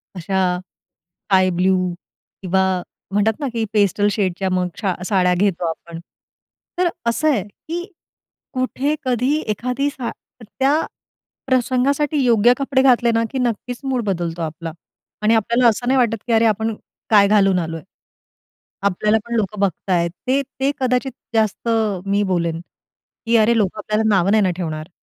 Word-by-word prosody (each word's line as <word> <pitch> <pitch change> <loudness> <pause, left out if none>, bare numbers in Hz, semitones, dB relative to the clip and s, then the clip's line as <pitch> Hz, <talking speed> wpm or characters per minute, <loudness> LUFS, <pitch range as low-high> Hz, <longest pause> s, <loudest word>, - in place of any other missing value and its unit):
अशा 180 0 0
sky 185 +2 -2
blue 185 +2 +2 0.7
किंवा 190 0 +1 0.5
म्हणतात 205 +2 +3
ना, 285 - -2
की 230 - -1
पेस्टल 205 0 +2
शेडच्या 190 -2 -1
मग 180 -1 +1
छा 190 -3 +1
साड्या 185 -3 +2
घेतो 185 -2 0
आपण. 165 0 -7 0.8
तर 360 -1 +2 0.2
असं 305 +7 0
आहे, 225 -10 +1
की 330 - -7 0.7
कुठे 260 +3 -1
कधी 255 +4 +1
एखादी 250 +6 -1
सा 255 -4 -5 0.3
त्या 270 +8 +1 0.7
प्रसंगासाठी 270 +3 +1
योग्य 235 0 +5
कपडे 270 -1 +1
घातले 240 -3 +4
ना, 230 - +2
की 270 - -3
नक्कीच 245 0 -2
मूड 255 -4 -1
बदलतो 175 -3 -2
आपला 160 +1 -5 0.5
आणि 220 +2 +4
आपल्याला 235 +3 +3
असं 245 +2 0
नाही 265 - +3
वाटत, 230 -2 +2
की 235 - -1
अरे 225 0 +4
आपण 220 +1 0 0.4
काय 200 -2 +6
घालून 195 -3 +4
आलोय. 165 -1 -4 1.0
आपल्याला 210 +3 +2
पण 235 - -4
लोकं 205 -1 -2
बघतायेत. 180 -2 0 0.2
ते 270 +2 +2 0.2
ते 275 +1 +2
कदाचित 255 0 0 0.2
जास्त 220 +1 0 0.4
मी 200 +1 +1
बोलेन, 170 -1 -1 0.7
की 230 0 +4
अरे, 225 +1 +4
लोकं 205 0 0
आपल्याला 215 +1 0
नावं 185 +2 +2
नाही 215 0 +4
ना 185 - +2
ठेवणार. 155 -3 -4
215 Hz, 150 wpm, -20 LUFS, 185-250 Hz, 1.0 s, काय